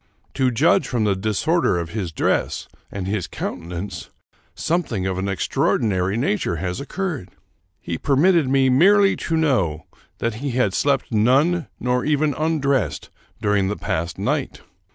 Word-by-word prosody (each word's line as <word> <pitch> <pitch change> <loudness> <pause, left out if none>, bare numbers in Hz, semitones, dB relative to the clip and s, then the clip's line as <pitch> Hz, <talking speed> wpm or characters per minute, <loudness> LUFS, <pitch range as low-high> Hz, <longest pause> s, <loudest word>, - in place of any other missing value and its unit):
To 130 -2 +2
judge 145 +10 +3
from 120 -4 0
the 100 -2 +2
disorder 110 - +1
of 85 -1 -4
his 100 -6 -3
dress, - - -1 0.2
and 100 -2 -4
his 95 -3 -2
countenance, 85 +5 -6 0.5
something 145 - -1
of 95 -1 -1
an 95 +1 -2
extraordinary 95 +1 0
nature 105 -8 0
has 90 +2 -3
occurred. 155 - -4 0.5
He 85 - -5
permitted 150 +1 +3
me 135 0 +3
merely 195 +8 +5
to 160 - -1
know 95 - +1 0.3
that 115 - -1
he 140 -3 -2
had 120 -6 +1
slept 140 +3 0
none, 135 +10 +3
nor 125 0 0
even 150 0 +1
undressed, 140 - -1 0.3
during 105 -2 +2
the 105 - -2
past 85 +1 -3
night. - - -2
120 Hz, 145 wpm, -22 LUFS, 95-145 Hz, 0.5 s, merely